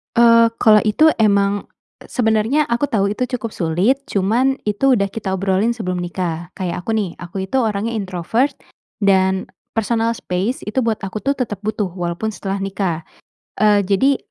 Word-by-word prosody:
Eee, 230 0 +6
kalau 215 -2 +7
itu 305 +10 +5
emang, 200 -2 +2 0.4
sebenarnya 225 +4 +1
aku 235 +5 +1
tahu 200 -6 +1
itu 250 +4 -1
cukup 230 -2 -5
sulit. 180 +10 +1
Cuman 230 +7 +1
itu 230 +6 +2
udah 200 -3 0
kita 200 -4 -3
obrolin 195 +4 +1
sebelum 185 -6 -3
nikah. 175 -1 -4
Kayak 180 -1 -4
aku 225 - 0
nih, 205 -5 -1
aku 190 +2 -5
itu 190 +7 -2
orangnya 220 -1 -1
introvert 210 - -1 0.5
dan 190 -1 +2 0.3
personal 230 +1 +1
space 195 +6 -3
itu 215 +5 -1
buat 225 -3 0
aku 195 +2 -4
tuh 275 +1 0
tetap 225 -6 -3
butuh, 215 -2 -1
walaupun 175 +4 -3
setelah 195 -2 -4
nikah. 195 -4 -2 0.6
Eee, 210 -1 +4
jadi, 260 +9 +3
210 Hz, 160 wpm, -19 LUFS, 190-230 Hz, 0.6 s, kalau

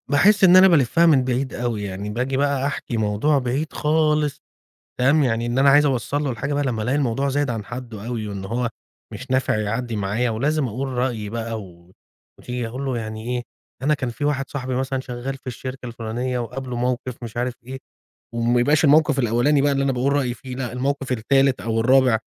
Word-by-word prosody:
باحس 200 +8 +5
إن 185 0 +8
أنا 190 +1 +8
بالفّها 165 0 +4
من 135 -6 +5
بعيد 130 +1 -1
أوي 115 -3 -2
يعني، 100 +1 -5
باجي 125 +4 -2
بقى 140 -1 +1
أحكي 135 -4 -3
موضوع 110 +8 +1
بعيد 135 +5 -2
خالص 150 -1 +1 0.6
تمام، 140 +5 +4
يعني 115 -2 0
إن 120 +2 -1
أنا 140 +1 +6
عايز 145 +2 +6
أوصل 140 +2 -1
له 135 - 0
الحاجة 140 +4 -3
بقى، 145 - +1
لمّا 115 -5 -1
ألاقي 125 +6 0
الموضوع 135 0 0
زايد 145 0 0
عن 110 -3 -3
حدُّه 120 -2 -8
أوي، 115 -3 -3
وإن 100 -1 -6
هو 120 +4 -1 0.4
مش 135 - -9
نافع 130 -4 +1
يعدّي 115 +2 -2
معايا، 105 +5 0
ولازم 140 +6 0
أقول 130 +5 -3
رأيي 125 -4 -2
بقى، 115 -1 -4
و 85 -1 -16 0.5
وتيجي 125 -1 -4
أقول 130 +4 -5
له 130 -3 -1
يعني 110 0 -6
ايه، 120 - -3 0.4
أنا 150 +3 +3
كان 130 -4 -3
في 145 +5 -5
واحد 140 -2 -1
صاحبي 130 -2 -3
مثلًا 130 0 -1
شغّال 130 +1 -5
في 130 - -25
الشركة 130 +1 -6
الفلانية، 120 +2 -3
وقابله 125 +2 -5
موقف 125 0 -2
مش 115 0 -8
عارف 125 +1 -1
إيه، 130 +2 -7 0.6
وما 120 +1 +2
يبقاش 150 +5 +3
الموقف 150 0 +4
الأولاني 120 +4 +2
بقى 145 0 +3
اللي 135 0 +1
أنا 135 - +1
باقول 130 +2 0
رأيي 130 -4 0
فيه 130 -1 -9
لأ، 125 -3 -4
الموقف 135 +1 -2
التالت 135 +1 +2
أو 115 +2 -1
الرابع، 125 -1 +4
125 Hz, 205 wpm, -22 LUFS, 115-140 Hz, 0.6 s, إن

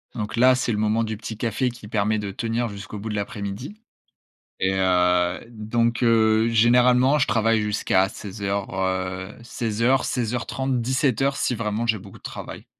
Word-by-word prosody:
donc 110 +2 -4
là, 130 +2 +6
c'est 125 -2 -1
le 105 - -1
moment 110 +2 +1
du 110 -1 -4
petit 110 0 -7
café 120 +3 0
qui 120 -3 -12
permet 110 0 0
de 100 -1 -4
tenir 115 +2 -2
jusqu'au 100 +1 -8
bout 110 +2 -5
de 105 - -3
l'après-midi, 100 - -5 0.8
et 95 +1 +1
heu, 90 -1 +2
donc 115 +2 -1
heu, 110 -1 +4
généralement, 125 +4 +4
je - - +2
travaille 115 -1 +2
jusqu'à 100 -2 +1
16:00, 100 -1 -4
heu, 95 0 -2
16:00-16:30-17:00 125 +3 0
si 125 - 0
vraiment 110 +1 -2
j'ai 110 -1 +2
beaucoup 95 0 -13
de - - -38
travail. - - -8
110 Hz, 155 wpm, -23 LUFS, 100-120 Hz, 0.8 s, là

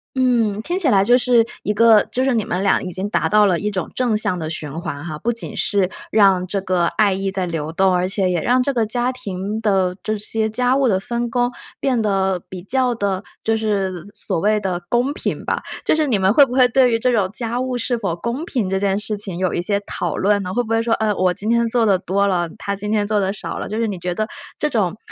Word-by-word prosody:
嗯， 235 -5 +2
听 350 +7 -2
起 345 - 0
来 195 -5 +4
就 245 +5 +5
是 245 -2 +4 0.2
一 - - -1
个 225 -1 +6
就 255 - 0
是 265 -1 +2
你 225 -3 +1
们 185 0 -2
俩 200 - +3
已 180 - -5
经 190 +3 -3
达 - - 0
到 210 0 +5
了 180 -4 +2
一 210 - -1
种 190 -4 -3
正 245 -4 +1
向 185 -4 -1
的 155 -1 -4
循 155 -2 -5
环 150 -3 -5
哈。 155 -3 -6
不 235 - 0
仅 230 - -6
是 195 -3 +1 0.2
让 195 -4 +4
这 195 +2 -1
个 180 -2 +1
爱 205 +1 +2
意 195 +1 -2
在 190 -1 -2
流 160 -3 -3
动， 190 +3 +2
而 180 0 +1
且 195 -1 0
也 175 -2 0
让 250 +8 +2
这 280 - -1
个 235 -3 +1
家 245 +3 0
庭 205 -3 -5
的 190 -4 +1
这 215 0 -2
些 220 +1 -1
家 250 +3 +1
务 270 -1 +2
的 190 -5 +2
分 235 +4 -3
工 245 +1 0 0.3
变 255 -4 +1
得 195 -3 +1
比 180 -2 -8
较 250 +3 +1
地 200 -3 -2 0.2
就 225 - +1
是 195 -5 -1
所 190 -3 -3
谓 210 +4 +2
的 185 -3 -2
公 245 +4 +1
平 - - -4
吧。 - - -1 0.2
就 - - +3
是 310 -1 +1
你 235 -6 +2
们 190 +1 +3
会 285 - +7
不 - - -10
会 255 -1 +5
对 255 0 +4
于 230 - +2
这 250 +2 +1
种 205 -6 +1
家 235 +2 -2
务 255 -1 -2
是 245 +1 -1
否 200 -7 -2
公 235 - -4
平 245 - -1
这 190 +1 0
件 195 0 +1
事 210 +1 -3
情， 195 -4 -4
有 185 -1 0
一 - - -1
些 200 +3 0
讨 175 -5 -4
论 205 +1 +2
呢？ 185 -1 -4
会 245 +5 0
不 220 - -10
会 225 0 +2
说： 230 0 0
“呃， 215 -1 0
我 185 -2 +2
今 200 +4 -5
天 235 0 +2
做 235 -1 +2
得 195 -3 +3
多 195 +2 0
了， 175 -4 0
她 200 - -3
今 205 +1 -4
天 210 -1 +1
做 210 0 +1
得 190 -1 0
少 200 - -6
了。” - - -4
就 215 - -3
是 230 0 0
你 195 -4 -4
觉 175 0 -3
得 215 +2 -1 0.3
这 300 - 0
种 210 - 0
210 Hz, 285 characters per minute, -20 LUFS, 190-235 Hz, 0.3 s, 会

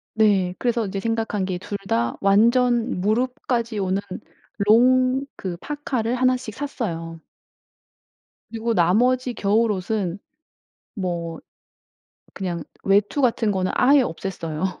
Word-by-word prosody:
네. 200 -5 +3
그래서 235 -2 0
이제 195 0 -4
생각한 225 -3 -1
게 185 -2 -2
2 200 +2 -5
다 115 +1 +1
완전 235 +2 +3
무릎까지 235 +1 -1
오는 190 0 0 0.6
롱 255 +5 +4
그 180 -3 -5
파카를 255 - -2
1 255 0 +3
씩 230 -4 -8
샀어요. 170 - -5 1.3
그리고 230 0 -2
나머지 245 +8 +2
겨울옷은 205 -3 0 0.8
뭐 170 -4 -3 1.0
그냥 175 -4 -4 0.2
외투 205 +8 +2
같은 230 -3 +2
거는 190 -2 -1
아예 275 +2 +5
없앴어요. 180 -3 -4
215 Hz, 215 characters per minute, -23 LUFS, 185-245 Hz, 1.3 s, 아예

